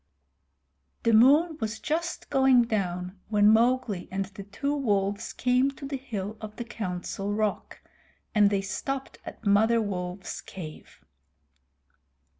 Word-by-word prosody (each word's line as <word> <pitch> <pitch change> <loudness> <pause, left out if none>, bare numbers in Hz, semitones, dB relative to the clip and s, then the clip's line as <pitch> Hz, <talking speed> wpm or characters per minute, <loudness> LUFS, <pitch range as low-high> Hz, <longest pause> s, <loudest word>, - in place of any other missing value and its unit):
The 230 - +3
moon 300 +8 +5
was 220 0 -2
just 335 +3 -3
going 265 -2 +5
down 185 -4 -3
when 210 -1 +5
Mowgli 230 -4 +2
and 195 +1 -2
the 195 +1 -10
two 280 +9 -3
wolves 205 -7 0
came 250 +2 +2
to 275 - -9
the 275 0 -3
hill 220 -5 -5
of 215 -1 -7
the 240 - -4
Council 195 -2 -4
Rock, 210 0 -2 0.5
and 205 -1 +5
they 200 -1 +1
stopped 265 +8 -4
at - - -9
Mother 220 +3 +4
Wolf's 185 -3 -4
cave. 155 - -10
215 Hz, 130 wpm, -27 LUFS, 195-255 Hz, 0.5 s, moon